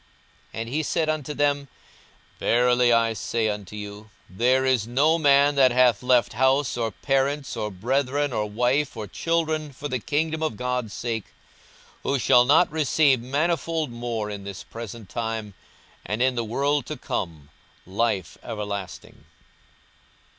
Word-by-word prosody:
42:018:029 115 - -5
And 115 - -5
he 150 +5 0
said 155 +1 0
unto 150 -1 -2
them, 145 -1 +1 0.7
Verily 125 0 +3
I 115 -1 +3
say 110 0 -1
unto 105 -1 -5
you, 105 +1 -8 0.2
There 125 +8 +2
is 125 -4 +2
no 150 +7 +3
man 145 -1 +5
that 135 -3 +5
hath 125 -3 +4
left 125 -2 +3
house, 130 +3 +2
or 115 -2 -1
parents, 135 +5 -1
or 105 - -2
brethren, 135 +7 -1
or 105 -1 -1
wife, 125 +5 0
or 110 - -4
children, 155 - -1
for 145 +2 -6
the 130 -3 -2
kingdom 155 +5 -1
of 155 -9 -2
God's 125 -2 -2
sake, 115 -2 -3 0.8
42:018:030 - - -1
Who - - +2
shall 125 -1 +5
not 155 +7 +4
receive 150 -4 +3
manifold 155 +2 -1
more 120 -3 -3
in 100 -1 -6
this 100 -1 -7
present 115 -2 -9
time, 115 -2 -4 0.5
and 105 +2 -3
in 130 +1 +3
the 120 -1 -2
world 140 +4 0
to 155 - -5
come 80 -6 -4 0.4
life 95 -3 -1
everlasting. 100 -5 -6
125 Hz, 155 wpm, -24 LUFS, 110-145 Hz, 0.8 s, man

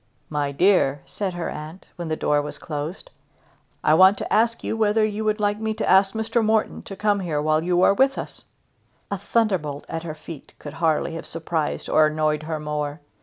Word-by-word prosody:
"My 145 -1 -1
dear," 145 -4 +3
said 190 -3 -4
her 175 -1 -3
aunt, 155 +4 -8
when 175 -2 -5
the 160 - -1
door 150 -1 +1
was 150 - -7
closed, 155 - -6 0.7
"I 155 - +4
want 190 +5 +6
to - - -4
ask 230 +2 +2
you - - -2
whether 215 0 +2
you 215 0 -3
would 215 0 +1
like 205 0 0
me 220 0 -2
to 220 - -2
ask 195 +2 +4
Mr. 225 +1 0
Morton 220 0 +1
to 195 - -9
come 205 0 +1
here 165 -6 -2
while 155 +1 +2
you 180 +1 +2
are - - +6
with 270 +6 +2
us?" - - -7 0.7
A 200 - -2
thunderbolt 190 -9 0
at 165 0 -4
her 160 -2 -6
feet 155 -1 -11
could 145 - -9
hardly 160 0 +1
have 165 - -6
surprised 160 -1 -2
or 155 0 +4
annoyed 155 0 0
her 160 -1 -2
more. 150 0 -3
175 Hz, 205 wpm, -23 LUFS, 155-210 Hz, 0.7 s, want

